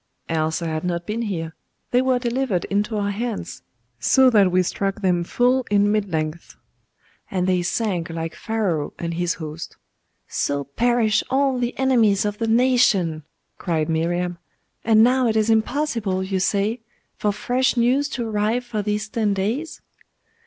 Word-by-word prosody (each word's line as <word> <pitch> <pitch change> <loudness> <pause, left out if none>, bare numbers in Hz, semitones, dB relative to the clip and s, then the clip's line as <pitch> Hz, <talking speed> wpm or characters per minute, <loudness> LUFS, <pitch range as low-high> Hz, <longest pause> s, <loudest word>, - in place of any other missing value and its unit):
'Else 160 +1 0
had 160 -2 -3
I - - -2
not 170 -1 -2
been 215 +2 -3
here. 165 -7 -3 0.4
They 245 - +4
were 260 -1 +2
delivered 245 -5 -1
into 210 +2 0
our 205 0 0
hands, 225 +1 -4 0.4
so 260 - +5
that 205 -5 +5
we 185 +1 +3
struck 195 +3 -3
them 175 -2 +2
full 250 +7 +2
in 205 0 +3
mid 210 -2 0
length, 155 +1 -3 0.7
and 185 -2 -1
they 185 -1 +2
sank 180 -2 -1
like 165 0 -4
Pharaoh 200 -10 -2
and 170 0 -3
his 175 0 -1
host.' 155 -1 -7 0.5
'So 140 0 -1
perish 225 - +1
all 270 -1 +1
the 245 0 -2
enemies 230 -7 +3
of 205 0 -3
the 225 - -1
nation!' 225 -9 +3 0.4
cried 160 -3 -1
Miriam. 175 +2 -1 0.4
'And 220 -1 +5
now 250 +1 +3
it 220 - 0
is 220 +1 +2
impossible, 220 -5 0
you 190 0 -2
say, 205 +5 0 0.3
for 210 - 0
fresh 245 +4 0
news 260 +5 +2
to 240 -4 -3
arrive 220 +3 0
for 220 -3 -3
these 210 +1 -2
ten 210 -2 0
days? 230 +12 -3
210 Hz, 160 wpm, -22 LUFS, 175-240 Hz, 0.7 s, so